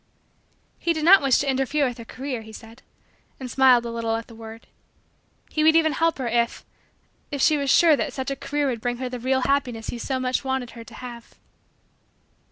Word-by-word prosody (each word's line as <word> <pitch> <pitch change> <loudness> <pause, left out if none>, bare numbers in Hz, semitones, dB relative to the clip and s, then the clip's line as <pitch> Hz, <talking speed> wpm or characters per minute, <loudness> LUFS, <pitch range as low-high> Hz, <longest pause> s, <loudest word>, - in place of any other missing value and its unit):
He 340 - +1
did 315 -1 -3
not 390 +3 +8
wish 270 -3 +3
to 285 - -1
interfere 270 +2 +1
with 245 -1 -6
her 230 - -9
career, 255 -1 -5
he 220 0 -12
said 225 +3 -13 0.6
and 255 -2 -6
smiled 255 -2 +5
a 235 - -4
little 230 -1 -2
at 225 0 -4
the 230 - -15
word. 225 0 -11 0.9
He 310 - 0
would 320 +1 +5
even 320 -1 +4
help 330 +2 +1
her 260 -3 -3
if 235 0 -1 0.6
if 285 - -4
she 305 +3 +4
was 280 -2 -1
sure 325 +2 +6
that - - -2
such 265 0 -4
a - - -2
career 290 +2 -2
would 245 -5 -2
bring 245 0 -2
her 255 0 -4
the 250 0 -6
real 260 +2 0
happiness 250 -5 -1
he 240 - -5
so 260 +2 -2
much 255 +1 -1
wanted 265 -2 -2
her 230 -1 -10
to - - -14
have. 240 -2 -10
255 Hz, 215 wpm, -24 LUFS, 235-280 Hz, 0.9 s, not